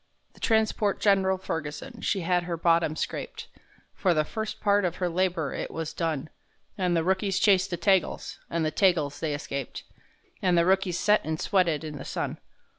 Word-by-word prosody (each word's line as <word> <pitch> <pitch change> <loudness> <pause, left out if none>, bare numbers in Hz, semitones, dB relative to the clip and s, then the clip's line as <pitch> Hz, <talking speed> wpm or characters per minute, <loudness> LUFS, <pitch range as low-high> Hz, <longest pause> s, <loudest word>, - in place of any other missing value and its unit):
The - - -19
transport 220 -2 +1
Gen'ral 190 -2 +3
Ferguson, 185 - -5
she 195 - 0
had 175 +1 +2
her 170 -1 -3
bottom 165 -1 +2
scraped, 455 - -4 0.5
For 180 -3 +1
the 155 0 +2
first 220 +5 -5
part 205 -1 +3
of 175 -1 -1
her 180 - -1
labor 175 -4 0
it - - -4
was 160 -1 -5
done, 155 -3 -2 0.4
An' 180 -3 0
the 165 - +2
rookies 190 +1 +1
chased 195 -1 +4
the 175 - -2
Tagals 190 0 +1
and 165 -1 0
the 155 - 0
Tagals 155 -7 +2
they 155 -3 -1
escaped,— 140 -2 -5 0.6
An' 180 -2 +3
the 170 0 +4
rookies 190 -1 +2
set 210 0 +3
and 160 0 -3
sweated 175 -6 +1
in 150 -2 -6
the - - -6
sun. - - -3
180 Hz, 185 wpm, -27 LUFS, 160-195 Hz, 0.6 s, chased